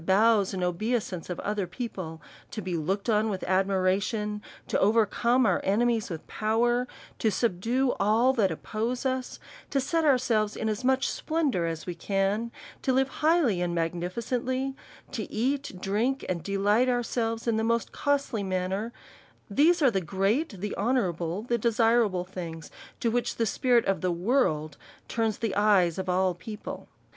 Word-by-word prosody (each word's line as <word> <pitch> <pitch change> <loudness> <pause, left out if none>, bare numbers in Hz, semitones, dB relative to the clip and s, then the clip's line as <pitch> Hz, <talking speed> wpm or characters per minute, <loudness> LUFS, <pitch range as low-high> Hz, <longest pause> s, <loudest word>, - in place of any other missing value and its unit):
219 190 +3 +3 0.2
bows 195 -1 -2
and 185 - -2
obeisance 185 0 -2
of 180 - -4
other 205 -2 -2
people, 175 -6 -6 0.3
to - - -6
be 185 -3 -3
looked 190 +7 -2
on 220 -1 +2
with 190 -3 -3
admiration, 195 +3 0 0.3
to - - 0
overcome 230 +4 +3
our - - +2
enemies 225 +2 +1
with 165 -3 -6
pow 220 +2 0
er, 240 +1 +2 0.3
to 220 - +2
subdue 235 +5 +1
all 225 +6 +3
that 215 -7 +2
oppose 225 - -3
us, 260 -1 -2 0.3
to 275 - +1
set 325 +5 0
ourselves 235 -7 +2
in 220 - -2
as 215 +3 -2
much 265 +1 +2
splendour 290 - 0
as 165 -1 -4
we 180 - -3
can, 195 +6 -1 0.3
to 265 - +1
live 265 +1 +2
highly 300 - +3
and 175 -1 -1
magni 170 +1 -1
ficently, 255 +5 -2 0.4
to 225 -6 -5
eat 270 +5 -1
and 185 - -12
drink, 230 +8 0
and 180 -2 -2
delight 205 +7 +2
ourselves 235 -2 -1
in 225 -1 +2
the 220 - 0
most 230 0 0
costly 280 -6 0
manner, 190 +3 -2 0.6
these 320 - +4
are 265 - +6
the 195 -3 0
great, 200 - 0
the 210 0 -3
honour 230 -3 +1
able, 170 +4 -4
the 235 0 0
desirable 225 -4 +2
things, 170 -4 -7 0.3
to 230 - +1
which 245 +1 -1
the 230 - +1
spirit 240 +2 +2
of 195 -4 0
the 185 - +1
world 170 - 0 0.3
turns 225 -2 -1
the 225 -4 -2
eyes 195 -5 +3
of 190 0 -3
all 185 0 +2
people. 210 +5 -8
215 Hz, 170 wpm, -27 LUFS, 185-245 Hz, 0.6 s, are